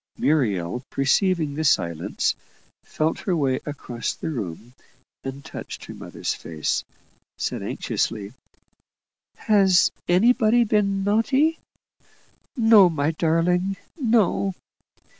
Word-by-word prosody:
Muriel, 125 - 0
perceiving 155 +2 +1
the 155 +2 -3
silence, 85 - +1 0.5
felt 155 +1 -1
her 185 - -1
way 135 -3 +1
across 125 -5 -4
the - - -4
room, 110 - -6 0.5
and 135 +1 -7
touching - - -8
her - - -10
mother's - - -3
face, 80 -2 -3 0.5
said, - - -3
anxiously, 105 0 -3 1.0
"Has 195 -4 +4 0.2
anybody 230 +5 +4
been 200 -3 +1
naughty?" 265 +10 +2 1.0
"No, 220 -5 +7
my 155 -2 0
darling; 175 +4 +1 0.2
no!" 220 - +1
165 Hz, 100 wpm, -23 LUFS, 135-205 Hz, 1.0 s, No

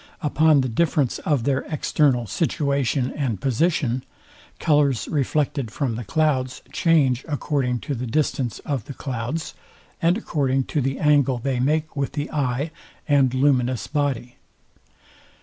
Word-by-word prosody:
Upon 150 0 +4
the 130 - -1
difference 145 0 +1
of 145 -6 0
their 135 +1 +1
external 145 -5 +1
situation 140 - 0
and 125 -9 -2
position: 130 - 0 0.5
Colours 145 -6 +2
reflected 140 -3 0
from 125 +2 -2
the 120 +2 -4
clouds 130 +1 0
change 140 -7 +2
according 135 -5 -1
to 145 - -3
the 125 -1 -4
distance 130 -2 -1
of 135 -7 -2
the 140 - -8
clouds, 135 +5 -4 0.5
and 170 +3 +3
according 135 - 0
to 150 - +2
the 135 +1 -1
angle 145 -4 +3
they 130 +1 -2
make 155 +5 0
with 140 -1 -2
the 145 0 -3
eye 140 +1 -1 0.4
and 140 -4 +4
luminous 130 -3 +2
body. 140 -5 -2
140 Hz, 135 wpm, -23 LUFS, 125-150 Hz, 0.5 s, Upon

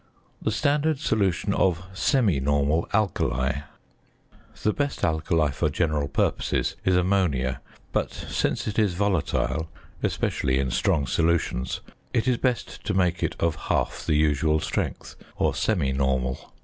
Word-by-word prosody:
The - - 0
standard 145 +6 +1
solution 100 -5 +1
of 90 -3 +1
semi 105 - +2
normal 70 +4 +1
"alkali." 70 -10 +1 1.0
The 105 - +3
best 145 -1 -2
alkali 80 -1 +1
for 75 - 0
general 75 -1 0
purposes - - 0
is 95 - +3
ammonia, 90 -9 +1 0.3
but, - - 0
since - - -2
it 105 +1 -1
is 100 -5 +2
volatile 85 -4 0 0.3
(especially 65 0 0
in 65 -2 0
strong 70 +3 +1
solutions), 80 -3 0 0.3
it 115 +2 +1
is 125 -2 +3
best 125 -1 -2
to 105 - -1
make 90 -2 +2
it - - -1
of 85 -2 +1
half - - 0
the 75 - +1
usual 75 +1 +2
strength, - - -3 0.2
or - - +1
semi 85 -12 +1
normal. 65 -1 -1
85 Hz, 135 wpm, -25 LUFS, 70-100 Hz, 1.0 s, The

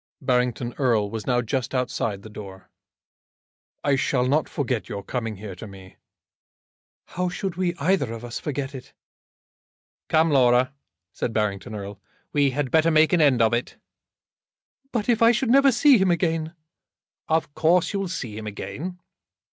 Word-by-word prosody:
Barrington 125 -1 0
Erle 110 -6 +2
was 110 -2 -5
now 125 -1 +2
just 130 +3 -2
outside 115 -5 -2
the - - -9
door. 95 -3 -10 1.1
"I 140 - +3
shall 125 -1 +1
not 145 +3 +1
forget 125 -5 -2
your 100 -1 -5
coming 115 -1 -3
here 100 0 -8
to 90 +5 -9
me." 95 -2 -13 1.1
"How 180 0 -2
should 185 0 -4
we, 180 -1 -1
either 160 -5 +1
of 115 +1 -7
us, 120 - -5
forget 140 -1 -4
it?" 130 -2 -10 1.2
"Come, 160 0 +3
Laura," 125 -1 +4 0.4
said 115 - -3
Barrington 105 0 -2
Erle, 100 -1 -7 0.3
"we 145 -2 +3
had 135 0 -2
better 160 +1 +4
make 155 +1 +4
an 175 - +4
end 130 -6 +4
of 110 0 +2
it." 120 +1 -2 1.1
"But 225 -4 -2
if 235 -1 +2
I 230 +1 +7
should 235 +1 0
never 275 +1 +6
see 255 +1 +5
him 190 -1 +3
again!" 165 -2 0 0.7
"Of 160 -2 0
course 170 +5 +2
you 200 - -1
will 195 - -2
see 125 - -5
him 110 0 -6
again." 175 - -6
135 Hz, 165 wpm, -24 LUFS, 115-170 Hz, 1.2 s, I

